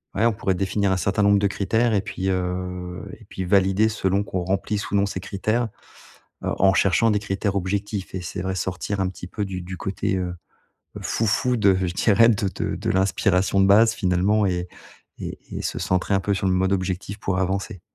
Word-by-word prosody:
ouais, 105 Hz, -, +2 dB
on 115 Hz, -, +5 dB
pourrait 100 Hz, -2 st, -1 dB
définir 95 Hz, +1 st, 0 dB
un -, -, +1 dB
certain 100 Hz, +2 st, 0 dB
nombre 100 Hz, 0 st, +5 dB
de 100 Hz, -, +2 dB
critères 110 Hz, +4 st, +1 dB
et 105 Hz, -, +3 dB
puis, 95 Hz, -1 st, -3 dB
heu, 90 Hz, -1 st, -3 dB, 0.2 s
et -, -, -16 dB
puis, 95 Hz, -, -5 dB
valider 95 Hz, +3 st, +3 dB
selon 100 Hz, -2 st, 0 dB
qu'on 95 Hz, -2 st, -3 dB
remplisse 100 Hz, +2 st, -1 dB
ou -, -, -1 dB
non 100 Hz, 0 st, +3 dB
ces 100 Hz, -2 st, -4 dB
critères, 110 Hz, +5 st, -1 dB, 0.8 s
heu, -, -, 0 dB
en 95 Hz, 0 st, +5 dB
cherchant 100 Hz, +4 st, +3 dB
des 105 Hz, -, +2 dB
critères 100 Hz, 0 st, -2 dB
objectifs 100 Hz, +1 st, -3 dB
et 95 Hz, -, -3 dB
c'est 90 Hz, +1 st, -5 dB
vrai, 95 Hz, 0 st, -2 dB
sortir 95 Hz, +2 st, -2 dB
un 95 Hz, -, +1 dB
petit 90 Hz, -1 st, -9 dB
peu 105 Hz, +3 st, -4 dB
du 95 Hz, -2 st, -4 dB
du 90 Hz, +1 st, -7 dB
côté, 95 Hz, +1 st, -2 dB
heu, 90 Hz, -1 st, -2 dB, 0.7 s
fou-fou 115 Hz, +3 st, +1 dB
de 100 Hz, -4 st, +4 dB
je 90 Hz, -2 st, -1 dB
dirais, 110 Hz, +3 st, +5 dB
de 105 Hz, -4 st, +2 dB
de -, -, -2 dB
de -, -, -3 dB
l'inspiration 95 Hz, 0 st, +2 dB
de 95 Hz, -, +5 dB
base 110 Hz, +3 st, +6 dB
finalement 100 Hz, +1 st, +2 dB
et 90 Hz, -1 st, -1 dB, 0.5 s
et -, -, -6 dB, 0.2 s
et -, -, -3 dB
se -, -, -3 dB
centrer 95 Hz, +2 st, 0 dB
un 95 Hz, -, +3 dB
peu 100 Hz, +1 st, 0 dB
sur 95 Hz, 0 st, -1 dB
le 95 Hz, -, +2 dB
mode 95 Hz, +1 st, +2 dB
objectif, 95 Hz, +2 st, -3 dB
pour 95 Hz, -2 st, -1 dB
avancer. 95 Hz, -1 st, -2 dB
95 Hz, 210 wpm, -23 LUFS, 95-100 Hz, 0.8 s, base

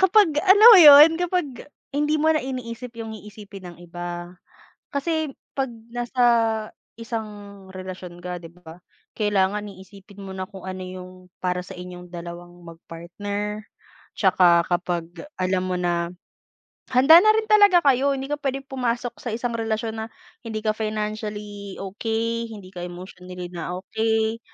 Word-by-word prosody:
kapag 380 Hz, -2 st, +5 dB
alam 400 Hz, +5 st, +8 dB
mo 410 Hz, -, +10 dB
'yon, 295 Hz, 0 st, +10 dB
kapag 355 Hz, -2 st, 0 dB, 0.5 s
hindi 295 Hz, +2 st, +1 dB
mo 315 Hz, +1 st, +3 dB
na 310 Hz, -, +1 dB
iniisip 250 Hz, -2 st, -6 dB
yung 225 Hz, -1 st, -6 dB
iisipin 205 Hz, -3 st, -11 dB
ng 175 Hz, -, -12 dB
iba. 175 Hz, 0 st, -7 dB, 0.6 s
Kasi, 315 Hz, +2 st, -1 dB, 0.3 s
'pag 270 Hz, -1 st, 0 dB, 0.2 s
nasa 245 Hz, +1 st, -2 dB, 0.7 s
isang 210 Hz, -4 st, -7 dB
relasyon 185 Hz, -1 st, -8 dB
ka 180 Hz, -1 st, -5 dB
'di 165 Hz, -, -10 dB
ba, 175 Hz, -1 st, -14 dB, 0.4 s
kailangan 205 Hz, -1 st, 0 dB
iisipin 195 Hz, +1 st, -14 dB
mo 190 Hz, -, -7 dB
na 185 Hz, 0 st, -5 dB
kung 190 Hz, -2 st, -12 dB
ano 185 Hz, 0 st, -6 dB
yung 185 Hz, 0 st, -9 dB, 0.3 s
para 180 Hz, 0 st, -1 dB
sa -, -, -10 dB
inyong 180 Hz, 0 st, -9 dB
dalawang 175 Hz, 0 st, -9 dB
mag-partner. 200 Hz, +6 st, -6 dB, 0.5 s
'Tsaka 180 Hz, -3 st, +4 dB
kapag 175 Hz, -1 st, -1 dB, 0.4 s
alam 185 Hz, 0 st, 0 dB
mo 180 Hz, -, -1 dB
na, 170 Hz, -1 st, 0 dB, 0.8 s
handa 270 Hz, +6 st, +8 dB
na 430 Hz, -, +5 dB
rin 440 Hz, 0 st, 0 dB
talaga 410 Hz, -4 st, +6 dB
kayo. 275 Hz, 0 st, +3 dB
Hindi 270 Hz, +1 st, -6 dB
ka 295 Hz, -, -1 dB
puwedeng 270 Hz, -1 st, -3 dB
pumasok 245 Hz, -2 st, -3 dB
sa -, -, -6 dB
isang 240 Hz, +1 st, -3 dB
relasyon 225 Hz, 0 st, -3 dB
na -, -, -7 dB, 0.4 s
hindi 220 Hz, -1 st, -4 dB
ka 215 Hz, -, +2 dB
financially 210 Hz, -2 st, -5 dB
okey, 225 Hz, +4 st, -3 dB
hindi 195 Hz, -3 st, -11 dB
ka 180 Hz, -, -8 dB
emotionally 180 Hz, 0 st, -9 dB
na 175 Hz, +1 st, -5 dB
okey, 220 Hz, +3 st, -1 dB
210 Hz, 145 wpm, -23 LUFS, 180-245 Hz, 0.8 s, mo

